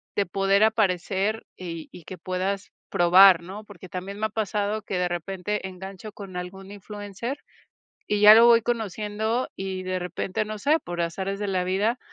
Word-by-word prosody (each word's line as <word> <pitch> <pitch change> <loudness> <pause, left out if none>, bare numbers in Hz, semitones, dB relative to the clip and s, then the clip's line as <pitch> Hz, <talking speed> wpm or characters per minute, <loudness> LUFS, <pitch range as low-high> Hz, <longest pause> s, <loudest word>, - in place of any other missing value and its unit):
de 200 - +1
poder 195 +3 +2
aparecer 205 0 +1
y 165 -3 -7
y 175 - -12
que 185 - -9
puedas 190 +2 -3 0.2
probar, 180 0 +6
¿no?, 195 +5 -8
porque 190 -3 -13
también 190 +2 -6
me 215 - -1
ha - - -1
pasado 210 -1 -2
que 195 - -4
de 180 0 +1
repente 190 +3 -3
engancho 190 +3 -9
con 195 -3 -10
algún 190 +2 -7
influencer 205 +5 -6 0.7
y 210 -1 +1
ya 210 +1 +10
lo 230 +1 +8
voy 235 -1 +7
conociendo 220 +1 -2
y 190 -1 -5
de 185 0 -2
repente, 180 +3 -3
no 215 0 -6
sé, 305 +8 +2
por 175 -1 -4
azares 190 +4 -3
de 210 - -2
la 185 -2 0
vida, 205 +7 0
195 Hz, 180 wpm, -25 LUFS, 185-210 Hz, 0.7 s, ya